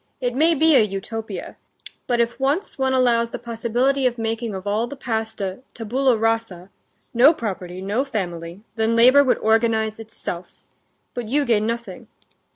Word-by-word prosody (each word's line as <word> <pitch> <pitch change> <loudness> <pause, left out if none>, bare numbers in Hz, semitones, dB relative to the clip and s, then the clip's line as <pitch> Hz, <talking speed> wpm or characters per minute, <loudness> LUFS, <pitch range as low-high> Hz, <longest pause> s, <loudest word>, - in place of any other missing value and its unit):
It 245 -1 -1
may 320 +6 +3
be 315 +1 +4
a - - +7
Utopia. 215 +2 -5 0.5
But 240 -1 +1
if 235 +2 0
once 280 +6 -1
one 265 0 +1
allows 235 -2 +2
the - - -5
possibility 245 +4 0
of 245 -1 -3
making 225 -1 -3
of 190 +1 -7
all 215 +3 0
the 285 - -8
past 225 -4 -3
a 190 +1 -3 0.2
tabula 245 +2 +1
rasa—no 225 - 0
property, 185 - -5
no 210 +7 0
family—then 205 +1 -3
labor 255 +5 +7
would 260 - +2
organize 220 -1 +1
itself. 200 -5 -7 0.6
But 245 -3 -5
you 285 +5 +1
gain 220 -3 +2
nothing...." 235 0 -5
230 Hz, 155 wpm, -22 LUFS, 215-255 Hz, 0.6 s, a